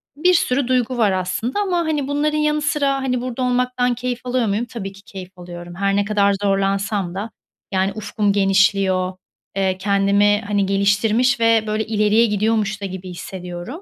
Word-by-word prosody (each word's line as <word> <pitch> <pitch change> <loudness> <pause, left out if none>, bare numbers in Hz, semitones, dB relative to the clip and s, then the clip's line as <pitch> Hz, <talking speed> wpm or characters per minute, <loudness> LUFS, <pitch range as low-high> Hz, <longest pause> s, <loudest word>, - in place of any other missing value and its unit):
Bir 360 +5 +3
sürü 265 -6 +1
duygu 255 -1 0
var 215 -4 +3
aslında 185 - -2
ama, 375 -4 0
hani, 310 -5 -1
bunların 300 +2 0
yanı 300 0 +1
sıra, 290 -2 +1
hani, 250 -2 -1
burada 255 0 -4
olmaktan 250 0 +1
keyif 245 0 -3
alıyor 250 -1 0
muyum? 210 +4 0
Tabii 210 -5 -6
ki 195 0 -16
keyif 185 -1 -10
alıyorum. 175 0 -9
Her 195 +1 0
ne 205 0 +1
kadar 200 -1 +2
zorlansam 195 -1 0
da, 210 +4 -4 0.4
yani, 190 +1 +1
ufkum 205 -1 -1
genişliyor, 195 -1 +2 0.4
eee, 190 -1 0
kendimi, 200 +1 +2
hani, 205 -1 +1
geliştirmiş 210 +5 +2
ve, 230 -1 +3
böyle, 215 +1 -1
ileriye 215 +1 +3
gidiyormuş 215 -1 0
da - - -3
gibi 185 -1 -7
hissediyorum. 180 - -7
210 Hz, 170 wpm, -20 LUFS, 195-250 Hz, 0.4 s, Bir